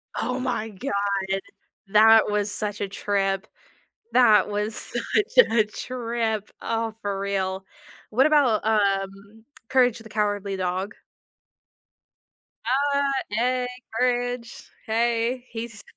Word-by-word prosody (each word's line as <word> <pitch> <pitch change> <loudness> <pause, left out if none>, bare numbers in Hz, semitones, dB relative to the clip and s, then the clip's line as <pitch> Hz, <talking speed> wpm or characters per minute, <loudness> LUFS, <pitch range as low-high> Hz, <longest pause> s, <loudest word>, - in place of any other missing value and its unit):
Oh 250 +1 -2
my 245 -4 -2
god! 200 -3 -2 0.5
That 220 +2 +6
was 210 0 0
such 205 -1 -4
a 200 - -1
trip. 195 0 -1 0.7
That 220 -5 +5
was 210 +1 -2
such 465 +3 +2
a 225 -2 +4
trip. 230 -2 -3
Oh, 225 -1 -2
for 200 -1 -2
real. 190 -1 -2 0.5
What 260 +6 +4
about, 280 -8 +4
um, 200 0 -1 0.2
Courage 250 -3 +3
the 225 - -12
Cowardly 205 -2 -1
Dog? 185 +2 -2 2.0
Uh, 280 0 +2 0.2
"Hey, 250 +3 0 0.3
courage, 245 0 -2 0.2
hey, 235 +2 0
he's" 225 -2 -7
220 Hz, 105 wpm, -24 LUFS, 200-240 Hz, 2.0 s, That